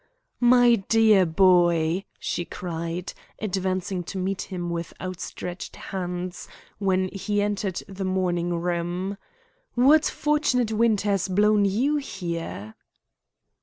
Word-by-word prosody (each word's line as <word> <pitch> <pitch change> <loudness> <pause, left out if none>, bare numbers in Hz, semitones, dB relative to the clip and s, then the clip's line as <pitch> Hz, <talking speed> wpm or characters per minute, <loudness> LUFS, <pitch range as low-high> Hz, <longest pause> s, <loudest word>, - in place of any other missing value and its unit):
"My 240 -1 +6
dear 220 -5 +5
boy," 175 0 +3
she 175 - -3
cried, 170 0 -5 0.2
advancing 185 -2 -2
to 195 - -6
meet 190 +1 -2
him 175 -2 -4
with 170 -1 -4
outstretched 180 -1 -6
hands 180 -1 -5 0.3
when 190 -2 +1
he 205 +2 -2
entered 205 -2 -1
the 195 0 -6
morning 175 -2 0
room. 175 +3 -2 0.6
"What 290 +6 +5
fortunate 295 -6 +1
wind 220 -1 +2
has 200 -3 0
blown 205 +2 +3
you 250 +10 +1
here?" 170 - -5
190 Hz, 110 wpm, -25 LUFS, 175-210 Hz, 0.6 s, My